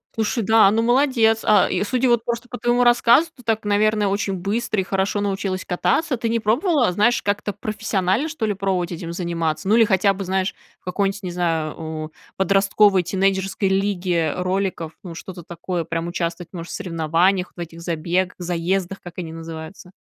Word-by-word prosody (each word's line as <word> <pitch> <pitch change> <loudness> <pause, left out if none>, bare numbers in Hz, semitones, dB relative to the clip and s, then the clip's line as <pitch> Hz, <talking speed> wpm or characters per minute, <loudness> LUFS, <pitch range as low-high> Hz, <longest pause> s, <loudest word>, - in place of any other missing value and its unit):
Слушай, 225 +1 0
да, 220 -2 +5
ну 225 +2 +2
молодец. 240 -3 +3
А, 210 -3 +5
и, 185 - 0
судя 255 +4 +1
вот 235 -2 +3
просто 235 +1 -3
по 245 - -7
твоему 240 0 +2
рассказу, 240 +6 +5
ты 250 - -16
так, 220 -1 -1
наверно, 210 0 +2
очень 200 0 -1
быстро 205 +3 -1
и - - +1
хорошо 195 +2 -1
научилась 195 -2 -2
кататься. 185 - 0
Ты 230 -1 -2
не 230 - +1
пробовала, 245 - +2
знаешь, 210 +5 +2
как-то 205 0 -1
профессионально, 210 - -1
что 290 -8 -3
ли, 210 - 0
пробовать 185 -3 -1
этим 170 0 -6
заниматься? 170 -1 -2
Ну, 215 - +4
или 230 - +6
хотя 195 -1 +3
бы, 195 0 -5
знаешь, 190 +1 -1 0.2
в - - -41
какой-нибудь, 195 +2 -1
не 180 - -4
знаю, 165 -3 -1
о, 155 -1 -5 0.3
подростковой 195 0 +3
тинейджерской 195 +2 0
лиге 185 -5 0
роликов, 185 -3 -2
ну, 175 -3 -8
что-то 175 0 -9
такое, 175 +1 -4
прям 165 +1 -3
участвовать, 170 0 -3
может, 170 -1 -7
в - - -4
соревнованиях, 180 +1 +1
в - - -16
этих 170 -1 -7
забе 175 +2 -1
заездах, 180 +2 -2
как 175 0 -11
они 165 -3 -5
называются? 165 +3 -9
195 Hz, 180 wpm, -22 LUFS, 175-215 Hz, 0.3 s, или